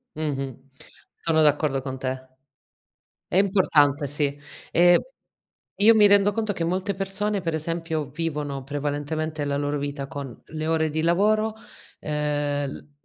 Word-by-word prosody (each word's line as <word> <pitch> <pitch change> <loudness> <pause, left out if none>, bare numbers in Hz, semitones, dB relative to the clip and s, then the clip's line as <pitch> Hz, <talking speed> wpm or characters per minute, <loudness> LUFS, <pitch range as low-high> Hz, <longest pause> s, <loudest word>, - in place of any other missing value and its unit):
Mh-mh, 135 -4 -4 0.5
sono 160 -1 +1
d'accordo 150 -2 +3
con 130 0 -5
te. 130 0 -4 1.0
È - - -4
importante, 155 -8 +3
sì. 145 0 -1 0.3
Ehm, 175 +1 +6 0.8
io 215 +3 +7
mi 210 -1 +6
rendo 205 0 +5
conto 215 0 -1
che 170 -4 -3
molte 185 +4 -1
persone 195 +2 -2
per 165 -3 -2
esempio 160 -2 -3
vivono 150 -3 -3
prevalentemente 145 +2 -3
la 140 0 -1
loro 145 0 -1
vita 140 -1 -4
con 140 -4 -8
le 155 0 -5
ore 160 -1 +1
di 155 +1 -1
lavoro, 215 +6 +2 0.5
ehm, 145 -1 -1
il 145 - -11
155 Hz, 140 wpm, -24 LUFS, 145-175 Hz, 1.0 s, io